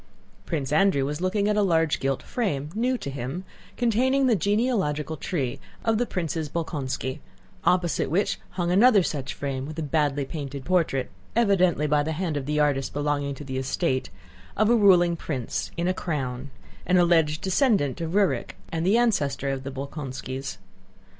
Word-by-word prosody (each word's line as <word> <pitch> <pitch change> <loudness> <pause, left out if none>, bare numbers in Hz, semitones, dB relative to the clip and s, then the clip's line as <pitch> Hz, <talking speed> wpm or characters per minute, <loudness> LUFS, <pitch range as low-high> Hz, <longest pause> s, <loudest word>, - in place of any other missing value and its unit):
Prince 145 -5 -2
Andrew 150 -4 +3
was 150 +3 -3
looking 200 +2 +1
at 210 - +2
a 210 - +3
large 165 -5 +2
gilt 135 -1 -1
frame, 150 - -2
new 250 +4 +1
to 140 - -5
him, 135 +7 -4 0.3
containing 255 +3 +2
the 245 -3 +4
genealogical 200 - 0
tree 140 -8 -3 0.3
of 225 -1 +2
the 245 - 0
Princes 165 -3 -2
Bolkónski, 145 -4 -3 0.5
opposite 175 -1 +2
which 190 +6 +1 0.2
hung 175 -1 0
another 205 +1 +6
such 140 -5 -3
frame 135 -1 -3
with 155 +1 -8
a 160 - -2
badly 145 -2 0
painted 140 -2 -6
portrait 165 -8 +1 0.2
(evidently 185 -9 +3
by 150 0 +3
the 160 +2 -2
hand 165 -1 -2
of 140 -2 -3
the 150 0 0
artist 140 -2 +1
belonging 145 -1 -1
to 145 - -9
the 130 -1 -3
estate) 130 0 -1 0.5
of 215 +2 +4
a - - +6
ruling 180 -5 +5
prince, 135 -7 -3
in 170 +1 0
a 185 - +2
crown—an 140 +2 -3
alleged 165 -3 +3
descendant 190 - +2
of 165 0 -3
Rúrik 200 -2 +1 0.2
and 165 +1 -1
ancestor 195 -12 +2
of 135 -1 -3
the 135 - -4
Bolkónskis. 135 -1 -5
160 Hz, 165 wpm, -25 LUFS, 140-190 Hz, 0.5 s, another